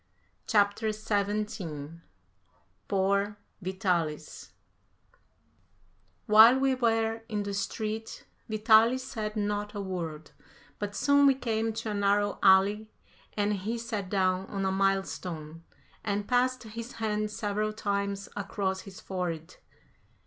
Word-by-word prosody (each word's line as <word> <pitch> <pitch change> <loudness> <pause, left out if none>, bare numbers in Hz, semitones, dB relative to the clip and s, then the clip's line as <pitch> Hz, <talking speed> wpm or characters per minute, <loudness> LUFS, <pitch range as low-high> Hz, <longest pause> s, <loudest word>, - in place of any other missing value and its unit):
CHAPTER 210 +1 +2
XVII 200 -7 -3 0.9
POOR 200 +1 +1 0.2
VITALIS 175 -5 -2 1.7
While 225 +3 +8
we 270 0 +2
were 225 -2 +1
in 210 -2 -1
the 200 0 -4
street 215 +2 -4 0.2
Vitalis 220 +3 +4
said 215 -4 -4
not 205 0 -2
a - - -3
word, 170 -5 -5 0.5
but 205 0 -4
soon 285 0 +4
we 270 - +5
came 225 -3 -1
to 225 0 -4
a - - -2
narrow 205 0 +1
alley 200 +3 +4 0.5
and 205 0 +1
he 210 +4 -3
sat 215 -5 -4
down 185 -1 +1
on 195 -1 -3
a 190 - +1
mile 195 0 +2
stone 165 -3 -7 0.4
and 205 0 -2
passed 255 +1 +1
his 230 +2 -7
hand 215 -1 -1
several 210 0 -2
times 200 -2 -2
across 195 -1 -2
his 195 -2 -11
forehead. 180 -2 -4
205 Hz, 120 wpm, -29 LUFS, 190-220 Hz, 1.7 s, While